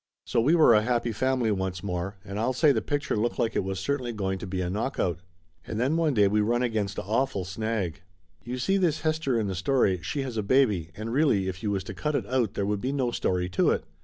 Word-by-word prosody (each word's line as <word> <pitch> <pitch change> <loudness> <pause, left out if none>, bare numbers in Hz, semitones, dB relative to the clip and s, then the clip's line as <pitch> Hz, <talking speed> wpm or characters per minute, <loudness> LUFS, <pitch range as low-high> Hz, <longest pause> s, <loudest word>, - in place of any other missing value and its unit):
So 115 - +1
we 150 +8 +4
were 155 -8 +6
a 105 - +5
happy 120 +1 0
family 130 0 +1
once 95 -2 -2
more, 95 +1 -3
and 100 0 -5
I'll 120 +4 +1
say 145 +4 +4
the 115 -5 +1
picture 145 +4 -1
looked 110 +3 -1
like 115 -2 0
it - - +1
was 95 0 -3
certainly 130 +2 -2
going 95 -3 -2
to - - -6
be 95 0 -3
a 90 - -1
knockout. 95 - -1 0.5
And 110 - -3
then 135 +6 +1
one 160 -4 +1
day 105 -2 +5
we 105 +2 +2
run 120 +4 +1
against 110 -5 -1
a - - -3
awful 105 -2 0
snag. 100 -2 -3 0.4
You 125 +2 -4
see 190 +11 +1
this 165 -5 +1
Hester 155 -6 0
in 110 - 0
the 95 - -2
story, 95 -2 +1
she 140 - -3
has 125 -4 -5
a - - +1
baby, 105 - +2
and 110 +2 -4
really 130 -10 +2
if 95 0 -4
you 105 - -1
was 100 -2 -1
to - - -7
cut 150 -1 -2
it - - -1
out 125 -5 0
there 100 - 0
would 105 0 -1
be 130 - -1
no 130 -4 0
story 90 -5 0
to 90 - +2
it. - - +1
110 Hz, 255 wpm, -27 LUFS, 95-130 Hz, 0.5 s, were